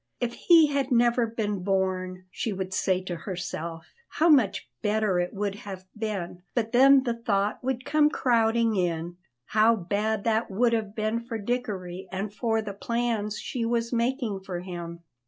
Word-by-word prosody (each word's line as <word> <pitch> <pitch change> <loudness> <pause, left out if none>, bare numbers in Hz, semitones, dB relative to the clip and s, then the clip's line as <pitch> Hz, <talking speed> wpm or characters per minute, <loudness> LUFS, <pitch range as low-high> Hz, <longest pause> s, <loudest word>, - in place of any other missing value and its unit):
If 240 -1 -1
he 335 -3 +6
had 280 -2 0
never 240 0 +3
been 210 -3 -2
born, 185 -1 -1
she 225 - -3
would 190 0 -4
say 185 0 +1
to 180 -1 -4
herself, 170 -2 -6
how 330 +2 +2
much 255 - +3
better 210 -3 +1
it 175 0 -1
would 200 0 -2
have 195 -2 -8
been; 200 -5 -4
but 225 -2 0
then 270 +2 +6
the 240 -3 0
thought 210 -3 -1
would 255 -1 -2
come 300 0 +4
crowding 230 -4 +2
in, 175 -1 -1 0.3
how 220 +2 +4
bad 205 +2 -1
that 225 0 +1
would 230 +4 +2
have 215 -2 -2
been 220 +1 0
for 235 -1 -5
Dickory 195 -5 -3
and 195 +2 -4
for 225 0 0
the 205 -2 -5
plans 225 -1 -1
she 245 -3 -4
was 230 +1 0
making 235 -3 0
for 190 -2 -5
him. 170 -2 -7
215 Hz, 170 wpm, -27 LUFS, 190-235 Hz, 0.3 s, he